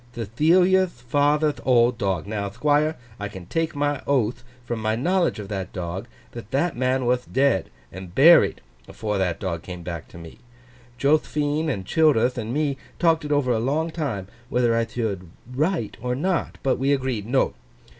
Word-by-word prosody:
'Thethilia'th 175 - +3 0.2
father'th 145 +3 +2
old 120 -2 +3
dog. 95 -7 -1
Now, 100 -1 -3
Thquire, 150 +7 +1 0.2
I 105 - -3
can 95 -3 -10
take 165 - -2
my 145 -1 0
oath, 120 -3 +1 0.2
from 120 -1 -3
my 110 0 0
knowledge 175 +8 +1
of 105 -2 -6
that 95 -3 -4
dog, 90 +4 -5 0.2
that 115 -3 -9
that 150 +7 0
man 130 +1 0
wath 125 0 0
dead—and 95 - -1
buried—afore 105 - +3
that 90 -3 0
dog 85 -4 -3
come 90 -1 -8
back 85 -3 -6
to - - -14
me. 85 +4 -11 0.6
Joth'phine 150 +2 +1
and 100 -9 -3
Childerth 125 - +3
and 110 0 -4
me 145 0 0 0.2
talked 165 -2 +2
it 150 - -4
over 145 -4 +2
a 115 - +1
long 150 +7 0
time, 130 - -3 0.2
whether 120 -2 +2
I 115 0 +1
thould 110 -6 -3 0.3
write 155 - -1
or 125 +1 -1
not. 180 +6 -1
But 135 - +1
we 135 +2 +1
agreed, 130 -6 -2
"No. 130 +2 +2
125 Hz, 165 wpm, -24 LUFS, 105-150 Hz, 0.6 s, Thethilia'th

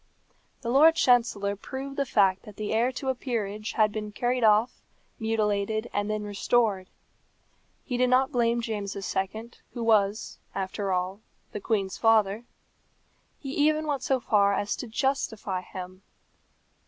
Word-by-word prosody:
The 235 -2 -3
Lord 310 +5 +6
Chancellor 230 -8 +2
proved 270 +6 -7
the 280 -1 -1
fact 195 -4 +3
that 210 - -13
the 215 0 -3
heir 235 +3 +2
to 265 +1 -4
a - - +2
peerage 215 -5 -4
had 215 -1 +3
been 210 0 -5
carried 245 +3 -1
off, 215 +2 +3 0.4
mutilated, 220 0 -1
and 205 +1 -1
then 215 0 -2
restored. 205 -1 0 1.0
He 250 -3 -2
did 250 0 +3
not 260 +2 +3
blame 235 -2 +1
James 205 -3 -4
II., 200 +4 -3 0.2
who 240 - -4
was, 215 -2 +1 0.2
after 195 +1 -2
all, 185 +3 -2 0.3
the 210 - -6
queen's 195 -3 -1
father. 220 -1 +3 0.9
He 270 - -7
even 305 +2 +2
went 285 -4 -1
so 265 -1 +1
far 200 -4 +3
as 205 +1 -1
to 250 - -6
justify 220 -6 -1
him. 185 0 -9
220 Hz, 150 wpm, -27 LUFS, 200-245 Hz, 1.0 s, Lord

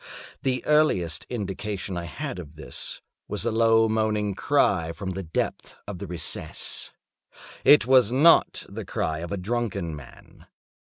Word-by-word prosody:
The 130 -1 -1
earliest 95 - +2
indication 100 -3 -4
I 85 -1 -4
had 80 +3 -5
of 80 -3 -10
this 80 - -6 0.3
was - - -3
a 115 - +1
low 115 0 +4
moaning 110 -2 0
cry 90 - +1
from 95 +1 -5
the 95 +1 -4
depth 80 -3 -3
of 100 -4 -6
the 100 - -6
recess. 85 -2 -4 0.7
It 145 -4 +7
was 125 -3 +5
not 150 +6 +5
the - - -7
cry 80 -1 -2
of 85 +1 -6
a 100 - -1
drunken 100 -5 -2
man. 70 -4 -14
100 Hz, 150 wpm, -25 LUFS, 85-115 Hz, 0.7 s, It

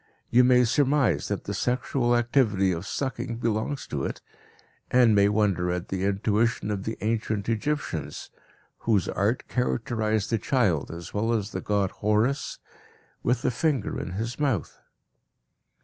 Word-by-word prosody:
You 125 +2 +6
may 125 0 +5
surmise 140 +1 +2
that - - -3
the - - -4
sexual 125 0 0
activity 115 -6 +2
of 85 +2 -4
sucking 125 -3 -3
belongs 115 +4 -1
to 70 -2 -3
it, - - -3 0.7
and 125 -3 +5
may 100 0 +5
wonder 100 -4 +1
at 90 0 -3
the 95 0 -1
intuition 105 +2 +1
of 100 -1 -3
the 110 - -3
ancient 110 -2 -1
Egyptians, 140 +7 -2 0.5
whose 105 -5 +1
art 110 +5 0
characterized 110 -3 -1
the 115 - +2
child, 105 - +1
as 85 +1 -8
well 110 +3 0
as 105 -2 -1
the - - -4
god 100 -2 0
Horus, 110 +7 0 0.6
with 120 0 0
the - - +2
finger 135 -3 -1
in 90 - -5
his 115 +6 -4
month. 135 - 0
110 Hz, 150 wpm, -26 LUFS, 100-125 Hz, 0.7 s, You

